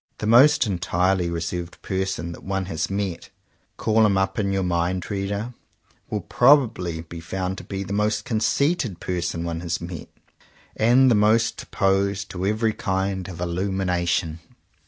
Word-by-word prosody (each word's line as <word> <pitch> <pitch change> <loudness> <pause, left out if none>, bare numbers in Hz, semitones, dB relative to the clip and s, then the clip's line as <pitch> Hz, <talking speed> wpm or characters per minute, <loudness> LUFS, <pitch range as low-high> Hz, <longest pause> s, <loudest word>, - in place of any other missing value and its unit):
The - - -4
most 130 +5 +6
entirely 90 -1 0
reserved 85 +1 -4
person 95 -3 -2
that - - -10
one 95 0 -2
has 85 -4 -3
met 95 -3 -3 0.2
— - - -43
call 110 0 +3
him 100 -3 +3
up 95 +1 0
in 100 -2 0
your 95 -1 0
mind, 90 +1 -1
reader! 100 +4 -3 0.3
— - - -37
will 105 - -2
probably 115 - +3
be 85 +1 -9
found 95 +3 -3
to - - -10
be 95 -1 -4
the 100 - -5
most 105 +1 0
conceited 115 - 0
person 85 -2 -2
one 85 -1 -3
has 85 -1 -2
met, 85 -2 -7 0.7
and 125 +4 +5
the - - +6
most 110 +2 +2
opposed 100 0 0
to 95 +1 -2
every 110 +1 +1
kind 95 -1 -2
of 90 -3 -8
illumination. 90 -2 -1
95 Hz, 160 wpm, -23 LUFS, 90-105 Hz, 0.7 s, most